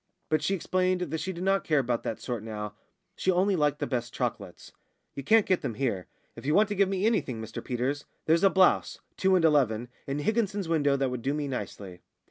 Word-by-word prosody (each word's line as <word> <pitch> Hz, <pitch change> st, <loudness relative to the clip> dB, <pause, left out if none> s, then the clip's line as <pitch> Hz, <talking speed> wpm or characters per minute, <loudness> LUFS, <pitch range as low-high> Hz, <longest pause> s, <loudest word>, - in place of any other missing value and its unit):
But 155 Hz, 0 st, +2 dB
she 195 Hz, -, +1 dB
explained 185 Hz, 0 st, 0 dB
that 160 Hz, -2 st, -2 dB
she 185 Hz, +4 st, -3 dB
did 175 Hz, 0 st, -6 dB
not 195 Hz, +1 st, +2 dB
care 155 Hz, -, +1 dB
about 120 Hz, -3 st, 0 dB
that 110 Hz, -, -4 dB
sort 120 Hz, -4 st, -4 dB
now; 105 Hz, -1 st, -6 dB, 0.4 s
she -, -, -1 dB
only 190 Hz, +2 st, +3 dB
liked 150 Hz, -3 st, +1 dB
the -, -, -2 dB
best 120 Hz, -2 st, -3 dB
chocolates. -, -, -4 dB, 0.4 s
"You 140 Hz, -, -5 dB
can't 220 Hz, +8 st, +5 dB
get 185 Hz, -2 st, +1 dB
them 115 Hz, -, -3 dB
here. 115 Hz, -8 st, -2 dB, 0.3 s
If -, -, -10 dB
you 150 Hz, +3 st, +1 dB
want 210 Hz, +1 st, +4 dB
to 205 Hz, -, -2 dB
give 200 Hz, -1 st, +3 dB
me 195 Hz, +1 st, 0 dB
anything, 205 Hz, -, 0 dB
Mr 110 Hz, 0 st, -7 dB
Peters, 130 Hz, +3 st, -2 dB, 0.2 s
there's 165 Hz, +3 st, +3 dB
a 195 Hz, -, +7 dB
blouse 190 Hz, -1 st, +3 dB, 0.2 s
(two 190 Hz, 0 st, +3 dB
and 175 Hz, -3 st, +3 dB
eleven) 125 Hz, -7 st, +2 dB, 0.2 s
in 140 Hz, +1 st, -2 dB
Higginson's 205 Hz, +2 st, 0 dB
window 145 Hz, -4 st, +2 dB
that 135 Hz, -2 st, 0 dB
would 125 Hz, -2 st, -4 dB
do 140 Hz, +4 st, -1 dB
me 150 Hz, -1 st, -2 dB
nicely." 100 Hz, -7 st, -6 dB
150 Hz, 225 wpm, -28 LUFS, 125-185 Hz, 0.4 s, a